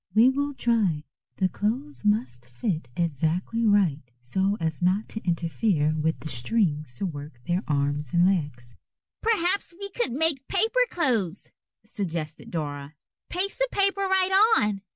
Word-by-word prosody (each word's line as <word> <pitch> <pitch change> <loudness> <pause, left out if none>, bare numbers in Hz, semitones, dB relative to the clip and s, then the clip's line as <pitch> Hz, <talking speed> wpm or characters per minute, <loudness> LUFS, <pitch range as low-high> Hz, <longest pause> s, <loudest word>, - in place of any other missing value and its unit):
We 230 +4 +7
will 285 +2 -1
try. 220 - +1 0.3
The 190 - +2
clothes 240 +11 -3
must 125 - 0
fit 130 - -3
exactly 170 - 0
right 190 -8 +3 0.2
so 190 +12 0
as 160 -1 -2
not 185 +4 +2
to 220 - -5
interfere 170 -2 +1
with 160 +1 -1
the - - -6
strings 150 - 0
to 160 - -2
work 145 -6 -7
their 175 +2 0
arms 145 -1 0
and 175 +1 +4
legs." 145 - -1 0.5
"Perhaps 395 -4 +1
we 400 0 -6
could 385 - -1
make 295 -1 0
paper 445 +6 +2
clothes," 225 - -1 0.3
suggested 170 -9 -5
Dora; 145 -2 -4 0.3
"paste 380 +5 -2
the - - +3
paper 395 0 +2
right 385 +3 +4
on." 210 -2 +1
190 Hz, 145 wpm, -26 LUFS, -, 0.5 s, We